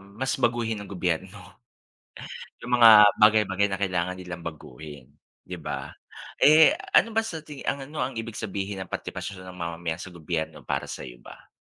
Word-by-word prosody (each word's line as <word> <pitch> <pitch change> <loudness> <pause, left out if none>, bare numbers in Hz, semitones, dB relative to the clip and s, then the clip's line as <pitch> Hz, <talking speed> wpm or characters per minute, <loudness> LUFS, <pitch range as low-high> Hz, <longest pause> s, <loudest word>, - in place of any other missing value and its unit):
mas 100 +7 -4
baguhin 115 -3 0
ang 100 - -9
gobyerno. 95 +1 -2 1.3
'Yung 125 - -6
mga 115 -1 +9 0.3
bagay-bagay 105 -2 +4
na 95 0 -3
kailangan 90 -1 -1
nilang 85 -2 -8
baguhin 75 -3 -10 0.4
'di - - -7
ba? - - -5 0.5
Eh, 155 - +7 0.2
ano 230 - +5
ba 225 - +2
sa 160 -5 -6
tingi 150 -3 -10
ang 140 0 -1
ano 150 +2 -9
ang 130 - -3
ibig 115 -1 -6
sabihin 100 -1 -4
ng 95 - -11
partipasyon 95 -2 -6
ng 90 0 -10
mamamayan 85 0 -4
sa - - -8
gobyerno 80 -1 -4
para - - -2
sa'yo - - -8
ba? - - -15
95 Hz, 165 wpm, -26 LUFS, 85-115 Hz, 1.3 s, mga